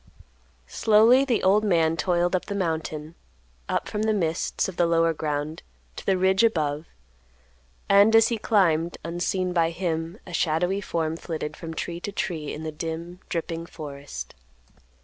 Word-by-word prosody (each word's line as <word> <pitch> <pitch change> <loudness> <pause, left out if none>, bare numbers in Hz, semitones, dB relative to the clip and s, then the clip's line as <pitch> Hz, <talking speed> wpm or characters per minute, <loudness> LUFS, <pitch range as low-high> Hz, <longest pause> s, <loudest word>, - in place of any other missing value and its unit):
Slowly 225 - +5
the 245 -5 0
old 200 +3 +4
man 165 -5 +2
toiled 175 +2 +1
up 180 - -1
the 200 - -4
mountain; 160 -4 -3 0.6
up - - -1
from 210 - -3
the 220 0 +1
mists 165 -5 -1
of 190 - -6
the 175 - +2
lower 165 0 +3
ground 150 0 -3 0.3
to - - -8
the 190 -1 +2
ridge 190 +3 +3
above; 155 -8 +1 1.0
and, 200 +3 +6
as 225 0 +6
he 230 -2 -2
climbed, 170 -6 +2
unseen 180 +2 -1
by 165 -2 +3
him, 165 0 -3
a 180 - -10
shadowy 175 +4 +1
form 165 -4 -2
flitted 155 -3 -5
from 165 0 -7
tree 170 +1 -4
to 205 - -5
tree 165 -7 -3
in 155 - -6
the 160 - -3
dim, 165 +3 -6
dripping 165 0 -3
forest. 140 - -8
170 Hz, 160 wpm, -25 LUFS, 160-190 Hz, 1.0 s, and